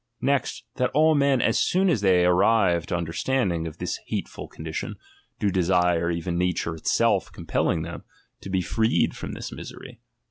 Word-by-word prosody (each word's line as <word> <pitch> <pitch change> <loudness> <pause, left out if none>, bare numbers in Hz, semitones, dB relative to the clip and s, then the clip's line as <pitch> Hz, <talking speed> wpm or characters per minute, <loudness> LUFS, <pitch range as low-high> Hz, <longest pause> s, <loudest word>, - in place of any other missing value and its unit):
Next, 140 +1 0
that 125 -2 +1
all 155 +1 +5
men 140 -4 +3
as 115 - +2
soon 190 +2 +2
as 145 - +2
they 90 -3 +4
arrive 90 -2 +3
to - - -1
understand 90 +6 0
ing 85 -1 -3
of 80 - -9
this - - -3
hateful - - -5
condition, 80 0 -6 0.4
do 100 - 0
desire, 90 -2 +2
even 85 +1 -2
nature 90 -2 0
itself 80 - +1
compelling 80 - -1
them, 85 0 -7 0.4
to - - -8
be 95 -1 +1
freed 110 +5 +1
from - - -6
this - - -6
misery. - - -10
90 Hz, 170 wpm, -25 LUFS, 85-115 Hz, 0.4 s, all